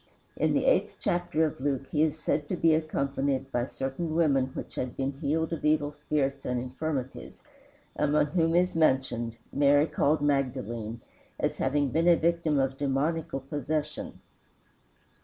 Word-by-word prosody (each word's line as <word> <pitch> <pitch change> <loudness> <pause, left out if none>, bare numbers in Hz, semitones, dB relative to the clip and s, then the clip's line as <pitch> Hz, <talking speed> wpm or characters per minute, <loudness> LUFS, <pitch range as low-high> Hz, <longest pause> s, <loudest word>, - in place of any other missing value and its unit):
In - - +1
the - - +1
eighth - - +2
chapter 175 -2 +1
of 150 -4 -4
Luke 135 -1 -1
he 150 - +1
is 155 0 +2
said 150 -1 -1
to - - 0
be 165 -2 +4
accompanied 140 -3 -1
by 120 +1 0
"certain 145 +6 -3
women 140 -6 +3
which - - -6
had 125 -1 -4
been 135 0 -1
healed 155 +4 -1
of 165 - -5
evil 150 -1 +2
spirits 145 -2 -2
and 125 -1 -1
infirmities," 130 +1 -5 0.5
among 150 0 +2
whom 165 +1 +1
is 180 +1 +3
mentioned 130 -7 +1 0.2
"Mary 145 +1 +4
called 150 -1 +1
Magdalene," 120 -5 -1 0.4
as - - -1
having 145 -1 +1
been 165 +5 +1
a 175 - +7
victim 165 -2 +1
of 135 0 0
demoniacal 145 +1 -1
possession. 150 +2 -3
145 Hz, 155 wpm, -28 LUFS, 135-160 Hz, 0.5 s, a